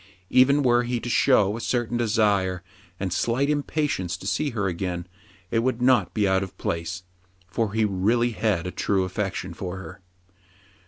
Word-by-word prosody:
Even 140 +3 +5
were 120 -1 +4
he 120 0 -2
to 120 - -5
show 105 -7 +4
a 115 - -5
.certain 120 -1 -1
desire 105 -6 +1 0.4
and 95 -2 -2
slight 130 +8 +1
impatience 145 - -1
to - - -12
see 145 +9 0
her 110 -6 -2
again, 90 -1 -3 0.5
it 115 - +2
would 125 0 0
not 125 -7 +3
be 105 -2 +2
out 95 0 +2
of 95 -1 -7
place; 85 +2 -3 0.4
for 100 +2 -2
he 110 0 +2
really 110 +5 +1
had 105 -6 0
a 90 - -3
true 95 0 0
affec 95 +1 -2
tion 90 -1 -5
for 90 +2 -5
her. 95 +1 -10
105 Hz, 175 wpm, -25 LUFS, 95-120 Hz, 0.5 s, Even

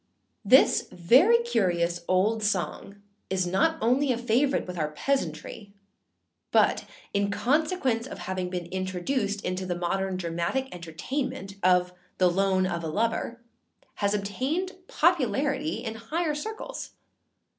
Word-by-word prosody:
[THIS - - +5
very 265 - +5
curious 175 - 0
old 205 +5 +2
song 195 -1 -2 0.3
is 185 -1 0
not 195 - +2
only 255 +4 +3
a 240 - 0
favourite 250 +4 +1
with 180 - -6
our 155 -1 0
peasantry, 200 - -3 0.8
but, - - +3 0.3
in 200 0 +1
consequence 265 - +1
of - - -8
having 185 -1 -3
been 180 -1 -4
introduced 190 +3 -2
into 185 +1 -2
the 180 -1 -2
modern 190 +2 -1
dramatic 170 +10 -2
entertainment 180 - -4
of 180 0 +3 0.2
The 180 -1 +4
Loan 190 0 +2
of 170 -2 -2
a - - -2
Lover, 230 +6 -1 0.6
has 205 0 +1
obtained 265 - -2 0.2
popularity 300 -2 +1
in 225 -3 -3
higher 300 +9 -2
circles. 440 +10 -6
200 Hz, 125 wpm, -27 LUFS, 180-265 Hz, 0.8 s, THIS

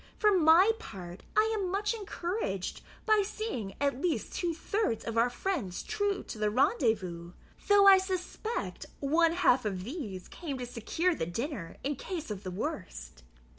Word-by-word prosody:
For 420 -2 +4
my 345 +5 +6
part, 180 - -9 0.2
I 435 +1 +4
am 390 -4 -1
much 410 +4 0
encouraged 360 - -3 0.2
by 435 -1 +5
seeing 390 - -4
at 280 -2 0
least 315 -11 -1
two 350 -2 -1
thirds 335 - -1
of 230 - -3
our 230 +2 +4
friends 245 - -3
true 410 -2 -1
to 220 - -8
the 210 0 +2
rendezvous, 210 - +1 0.3
though 410 -1 +6
I 385 -1 +9
suspect 380 +4 -4
one 325 +4 +3
half 265 -7 +4
of 190 -4 -2
these 210 - -6
came 295 -6 -5
to 250 - -4
secure 285 +10 0
the 160 - -3
dinner 230 - -4
in 280 0 -1
case 325 - -5
of 200 -2 -4
the 185 - -5
worst." 60 - -5
285 Hz, 165 wpm, -30 LUFS, -, 0.3 s, I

